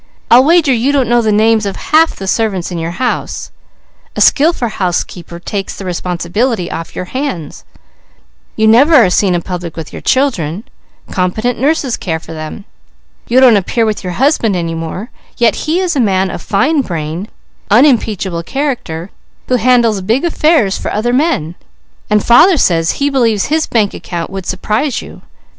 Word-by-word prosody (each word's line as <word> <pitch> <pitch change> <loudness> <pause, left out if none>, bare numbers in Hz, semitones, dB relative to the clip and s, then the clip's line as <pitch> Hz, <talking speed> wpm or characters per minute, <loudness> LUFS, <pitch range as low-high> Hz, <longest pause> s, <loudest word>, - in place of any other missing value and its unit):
I'll 245 +2 +8
wager 320 -2 +4
you 245 +4 +1
don't 275 -4 +1
know 240 0 +3
the 220 -2 +1
names 215 0 +2
of 195 - -4
half 320 +2 +2
the 195 - -7
servants 195 -3 -1
in 175 - -4
your 165 +1 -5
house; 250 +2 -3 0.6
a - - -4
skillful 300 -4 +3
housekeeper 175 -4 -3
takes 195 +2 -5
the 195 - -8
responsibility 180 +4 -2
off 165 - -6
your 180 - -4
hands. 255 - -5 0.9
You 220 0 +2
never 270 +9 +5
are 225 -10 +5
seen 185 -1 +2
in 170 - -2
public 175 -3 -6
with 160 -2 -7
your - - -7
children; 210 - 0 0.5
competent 215 +7 -1
nurses 275 -2 0
care 160 -3 -3
for 165 - -11
them. 155 +5 -7 0.6
You 245 +2 +3
don't 250 -5 +6
appear 225 +4 0
with 215 -2 -2
your 180 -1 -4
husband 245 - +1
any 165 -2 -2
more; 165 +8 -6 0.3
yet 235 -2 +3 0.2
he 335 +3 +2
is 360 -3 -1
a - - 0
man 190 -5 +1
of - - -6
fine 280 +9 +1
brain, 170 - -5 0.4
unimpeachable 215 - +2
character, 200 - -4 0.4
who 250 - +3
handles 235 -3 +2
big 230 - 0
affairs 305 - +2
for - - -4
other 235 +3 -1
men, 260 - 0 0.6
and 210 -1 +2
father 320 +10 +6
says 165 -8 +2
he 285 0 -1
believes 230 -6 +1
his 315 0 +1
bank 215 -4 +1
account 170 -1 -6
would 190 -2 -6
surprise 215 +8 -1
you. - - -12
215 Hz, 170 wpm, -14 LUFS, 180-260 Hz, 0.9 s, I'll